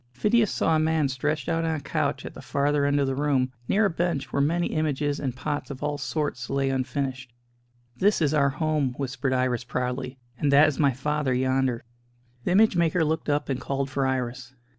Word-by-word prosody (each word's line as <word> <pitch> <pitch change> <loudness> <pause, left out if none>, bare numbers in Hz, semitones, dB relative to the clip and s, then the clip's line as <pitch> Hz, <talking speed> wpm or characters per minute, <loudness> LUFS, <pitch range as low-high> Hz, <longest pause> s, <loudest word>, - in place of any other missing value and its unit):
Phidias 210 - +2
saw 160 - +1
a - - +3
man 155 -2 +2
stretched 145 +2 -2
out 165 0 0
on 160 -1 0
a - - -3
couch 140 - -2
at - - -7
the - - -10
farther 145 0 +1
end 145 0 +2
of 140 - +2
the 135 - -1
room, 135 -2 +1 0.2
near 215 +2 +3
a - - +3
bench 170 -4 -2
where 140 - +2
many 170 +4 +1
images 145 -2 -1
and 130 -4 -3
pots 145 +2 -3
of 135 -2 -7
all 145 0 -2
sorts 145 -5 -3
lay 135 0 0
unfinished. 130 -1 -3 0.7
"This 205 +6 +3
is 155 -3 +1
our 140 -2 +3
home," 145 -2 -1
whispered 135 0 -2
Iris 125 -2 0
proudly, 125 +1 -3 0.2
"and 145 - +2
that 145 +2 +7
is 145 - -2
my 140 -3 +4
father 145 0 -1
yonder." 130 -1 0 0.6
The - - +1
image 215 +1 +5
maker 170 -1 +2
looked 160 0 -1
up 145 0 0
and 130 -2 -2
called 135 +1 -2
for 135 -1 0
Iris. 125 0 -3
140 Hz, 205 wpm, -26 LUFS, 130-155 Hz, 0.7 s, that